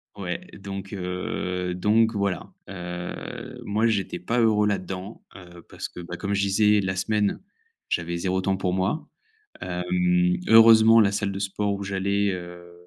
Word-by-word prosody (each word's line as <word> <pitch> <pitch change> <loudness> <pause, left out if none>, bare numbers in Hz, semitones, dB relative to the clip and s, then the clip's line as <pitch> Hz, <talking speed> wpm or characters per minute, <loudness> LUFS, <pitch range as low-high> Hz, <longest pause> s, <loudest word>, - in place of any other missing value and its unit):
Ouais, 90 -4 -3 0.2
donc 100 0 -7
heu, 90 -1 -3
donc 110 +5 +2
voilà. 100 -4 -2 0.2
Heu, 90 -2 -7
moi, 110 +3 +1
j'étais 100 -5 -1
pas 115 +8 -1
heureux 105 -2 +3
là-dedans, 95 0 -4
heu, 85 -2 -13
parce - - -6
que, 90 - -9
bah, 85 0 -7
comme 100 0 -2
je 100 - +1
disais, 105 +1 +3
la 95 0 -2
semaine, 105 +2 0 0.5
j'avais 85 0 -1
0 95 +1 -1
temps 95 0 0
pour 90 -1 -1
moi. 95 +12 -1 0.5
Hem, 90 0 +1
heureusement, 115 0 +8
la 100 -2 +3
salle 100 -1 -1
de 95 - -5
sport 100 +1 -1
où 100 0 -5
j'allais, 100 +1 0
heu, 85 -1 -8
95 Hz, 160 wpm, -25 LUFS, 90-105 Hz, 0.5 s, heureusement